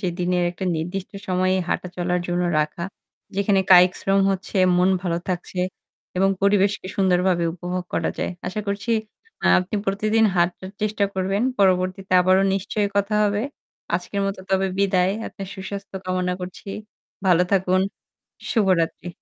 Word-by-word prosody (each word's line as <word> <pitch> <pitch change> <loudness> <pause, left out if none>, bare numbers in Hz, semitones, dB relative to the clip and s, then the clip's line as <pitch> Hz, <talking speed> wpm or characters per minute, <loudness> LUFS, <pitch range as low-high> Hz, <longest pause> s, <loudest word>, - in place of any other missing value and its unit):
যে 190 - -2
দিনের 180 0 +1
একটা 180 +2 -6
নির্দিষ্ট 180 +4 -4 0.2
সময়ে 185 +1 +2
হাঁটা 180 - -1
চলার 180 0 0
জন্য 175 0 0 0.2
রাখা। 150 +3 -3 0.5
যেখানে 200 -1 +3
কায়িক 180 0 +8
শ্রম 195 0 +2
হচ্ছে, 195 +1 -3 0.2
মন 180 +1 +4
ভালো 170 -2 -1
থাকছে 180 0 -3 0.6
এবং 195 +1 +3
পরিবেশকে 200 -1 +2
সুন্দরভাবে 180 -2 +2
উপভোগ 180 +1 -4
করা - - 0
যায়। - - -1 0.2
আশা 185 +4 -2
করছি 200 +3 -2 0.5
আ - - +3
আপনি 185 +3 -4
প্রতিদিন 215 +3 +2
হাঁটার 175 +2 0
চেষ্টা 210 -1 +1
করবেন। 195 +3 0 0.2
পরবর্তীতে 185 0 +1
আবারও 185 +1 +4
নিশ্চয়ই 200 +1 -1
কথা 200 +1 +1
হবে। 205 +1 +1 0.5
আজকের 180 +3 -2
মত 195 - -2
তবে 190 0 +2
বিদায়। 190 -1 +2
আপনার 195 - -7
সুস্বাস্থ্য 195 0 -7
কামনা 185 0 0
করছি। 180 +2 -8 0.6
ভালো 180 -1 +5
থাকুন। 185 -1 +3 0.7
শুভরাত্রি। 185 -6 +1
185 Hz, 145 wpm, -23 LUFS, 180-200 Hz, 0.7 s, কায়িক